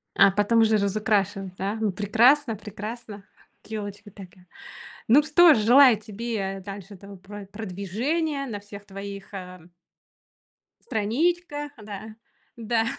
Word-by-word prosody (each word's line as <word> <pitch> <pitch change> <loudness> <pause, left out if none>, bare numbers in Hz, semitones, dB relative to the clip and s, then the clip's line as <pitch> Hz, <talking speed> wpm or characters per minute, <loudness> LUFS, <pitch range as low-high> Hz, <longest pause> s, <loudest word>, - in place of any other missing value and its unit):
А 195 - +7
потом 205 +4 +2
уже 220 -1 +4
разукрашевать, 200 -2 0
да. 195 +3 -3
Ну, 215 -2 0
прекрасно, 225 +7 +3
прекрасно. 210 +1 -8 0.4
Ёлочка 205 -1 -7
такая. 185 -2 -14 0.6
Ну 270 +6 +6
что 315 +2 +6
же, 220 - +1
желаю 245 0 +7
тебе 210 -3 -4
дальше 200 0 -9
этого 200 +1 -12
про 200 +2 -10
продвижения 225 - -3
на 220 -6 -5
всех 205 0 -12
твоих, 200 0 -9
э 180 -3 -9 1.1
страничках, 295 - -1
да. 215 0 -9 0.4
Да. 225 0 0
210 Hz, 120 wpm, -25 LUFS, 200-235 Hz, 1.1 s, А